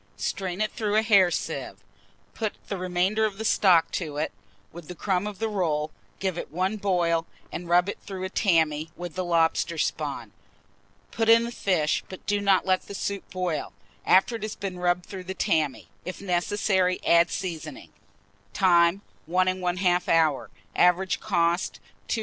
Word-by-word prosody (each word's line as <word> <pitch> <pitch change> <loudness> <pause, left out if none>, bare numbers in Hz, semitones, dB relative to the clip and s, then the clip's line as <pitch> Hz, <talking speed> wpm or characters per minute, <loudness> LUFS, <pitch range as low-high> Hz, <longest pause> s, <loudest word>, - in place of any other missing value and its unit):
Strain 190 -1 -3
it 215 - 0
through 210 -2 -2
a 220 - +4
hair 200 -5 +5
sieve, - - -4 0.6
put 215 -2 -2 0.2
the 200 - -2
remainder 185 +4 0
of 210 -2 -1
the 220 - -4
stock 180 -6 +4
to 155 -5 -4
it, 150 - -1 0.4
with 170 -2 -11
the 180 - -7
crumb 185 +4 -1
of 210 -2 -6
the 225 - -1
rolls; 155 -7 -1 0.3
give 190 -3 -2
it - - -6
one 185 +6 -1
boil, 175 -5 +1 0.2
and 175 -1 -6
rub 175 +1 +4
it 200 - -4
through 190 -2 -7
a 190 - -3
tammy, 160 -6 +1
with 175 -2 -7
the 185 - -2
lobster 170 -1 +1
spawn. - - -3 0.8
Put 225 -1 0
in 230 0 +7
the 235 - -4
fish, 175 -9 0
but 185 - -10
do 205 0 0
not 195 -2 +3
let 185 -1 +1
the 200 - -7
soup 200 0 -4
boil, 180 -4 -3 0.3
after 195 +5 +4
it - - -15
has 215 0 -4
been 190 -3 -5
rubbed 175 0 +1
through 190 -2 -8
the 190 +1 -5
tammy. 160 -9 0 0.2
If 185 - -6
necessary, 185 0 +1
add 170 +1 +5
seasoning. 170 -5 -6 0.6
Time. 175 0 +4 0.2
1 185 +2 +2 0.2
1/2 180 0 +1
hour. 160 -4 +2 0.3
Average 180 +2 +3
cost, 175 -3 0 0.3
2s. 230 - -1
185 Hz, 175 wpm, -26 LUFS, 170-200 Hz, 0.8 s, in